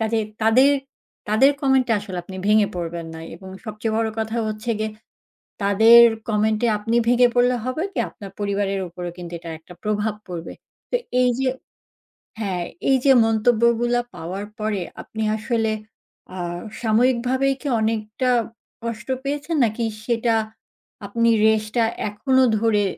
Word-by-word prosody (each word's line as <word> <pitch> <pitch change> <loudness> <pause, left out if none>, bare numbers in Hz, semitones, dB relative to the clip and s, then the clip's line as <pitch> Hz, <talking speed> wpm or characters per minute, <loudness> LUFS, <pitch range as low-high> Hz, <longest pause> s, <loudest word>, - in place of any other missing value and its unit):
কাজেই 220 0 0 0.2
তাদের 255 +5 +6 0.6
তাদের, 265 +6 +5
comment-এ 265 -3 +3
আসলে 190 -3 -6
আপনি 190 0 -9
ভেঙে 210 -1 +5
পড়বেন 170 -1 -4
না 160 - -8 0.2
এবং 190 +1 -12 0.2
সবচেয়ে 220 0 -3
বড় 225 0 +1
কথা 220 +1 -2
হচ্ছে 215 +2 -4
গিয়ে 215 0 -1 0.7
তাদের 220 +4 +7 0.3
comment-এ 215 +2 +1
আপনি 225 +3 -1
ভেঙে 245 0 +5
পড়লে 245 +1 +4
হবে 255 +7 -2
কি, - - -2
আপনার 195 -2 -11
পরিবারের 200 -1 -1
উপরও 175 0 -6
কিন্তু 175 -1 -8
এটার 165 -1 -7
একটা 180 +2 -14
প্রভাব 210 0 0
পড়বে। 170 -2 -6 0.4
তো - - +2 0.3
এইযে 250 +1 +2 0.9
হ্যাঁ, 185 -4 -2 0.3
এইযে 265 +1 +5
মন্তব্যগুলা 235 +2 +2
পাওয়ার 185 +5 -5 0.2
পরে 210 -3 -1 0.2
আপনি 220 0 -6
আসলে 225 -1 0 0.6
আ - - -5 0.4
সাময়িকভাবেই 250 +4 +2
কি 290 - -3
অনেকটা 220 +3 -1 0.5
কষ্ট 230 0 -5 0.2
পেয়েছেন? 290 +3 -2
নাকি 230 +1 -1 0.2
সেটা 230 -1 +1 0.7
আপনি 230 +3 +1 0.2
রেশটা 220 +2 +1 0.2
এখনও 260 +5 +2 0.2
ধরে 210 -3 +2
220 Hz, 135 wpm, -22 LUFS, 205-245 Hz, 0.9 s, তাদের